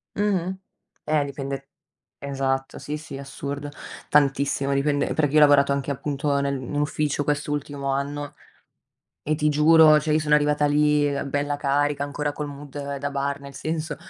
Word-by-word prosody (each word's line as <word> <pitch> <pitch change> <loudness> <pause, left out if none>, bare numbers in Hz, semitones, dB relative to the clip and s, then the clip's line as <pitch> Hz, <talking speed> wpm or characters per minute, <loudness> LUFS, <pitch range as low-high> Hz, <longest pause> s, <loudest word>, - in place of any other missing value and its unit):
Mh-mh, 190 -3 0 0.5
eh 150 -2 +1
dipende. 135 -1 -5 0.5
Esatto 135 -1 -2
sì, 150 - -4
sì, 150 -2 -8
assurdo. 140 +1 -6 0.4
Tantissimo, 140 -1 +2
dipende 145 +1 0
perché 145 -3 +1
io - - +4
ho - - +7
lavorato 145 -1 +6
anche, 140 0 -1
appunto, 140 +1 -1
nel 140 -1 -1
in 130 +3 -6
ufficio 145 0 0
quest'ultimo 145 -1 -2
anno 145 +1 -3 0.9
e 155 - 0
ti 150 0 0
giuro, 155 +1 +6
cioè 155 +1 0
io 155 - +3
sono 150 -1 +3
arrivata 150 0 +2
lì 150 0 +3 0.2
bella 145 +1 -1
carica 145 0 0
ancora 145 +1 -3
col 150 0 -4
mood 140 0 -6
da 140 +1 -3
bar 140 0 -2
nel 140 0 -11
senso 155 +2 -3
145 Hz, 155 wpm, -24 LUFS, 140-150 Hz, 0.9 s, ho